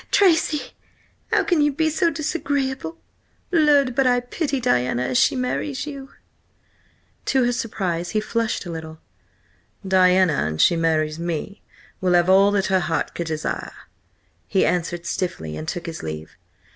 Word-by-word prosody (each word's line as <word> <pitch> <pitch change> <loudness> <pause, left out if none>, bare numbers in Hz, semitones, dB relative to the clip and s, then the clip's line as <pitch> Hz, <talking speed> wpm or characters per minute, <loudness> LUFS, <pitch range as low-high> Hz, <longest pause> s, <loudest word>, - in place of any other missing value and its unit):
"Tracy, 325 -6 +2 0.6
how 425 -3 +3
can 345 -3 +2
you 295 0 +3
be 315 +2 0
so 335 +2 +2
disagreeable? 285 -1 -2 0.5
Lud! 295 -6 +4
but 265 +1 +2
I 245 0 +3
pity 275 +3 -2
Diana 125 - +1
an 125 - -2
she 125 - +3
marries 260 +2 -2
you!" 275 -2 -8 1.2
To 265 -1 +2
her 245 - +2
surprise 185 -8 -2
he 215 - 0
flushed 225 -1 -2
a 175 - -5
little. 160 -1 -7 0.9
"Diana, 185 -2 +4
an 80 0 -4
she 170 - +4
marries 160 -1 0
me, 170 +4 -4 0.4
will 180 -1 +2
have 175 +1 +4
all 195 +1 +6
that 195 -2 +1
her 190 0 +2
heart 165 -2 -2
could 170 - -4
desire," 155 -1 -3 0.7
he 195 - +2
answered 175 -1 -1
stiffly, 170 - -3
and 80 +1 -6
took 175 - -4
his 165 -1 -6
leave. 80 0 -7
195 Hz, 155 wpm, -22 LUFS, 165-275 Hz, 1.2 s, all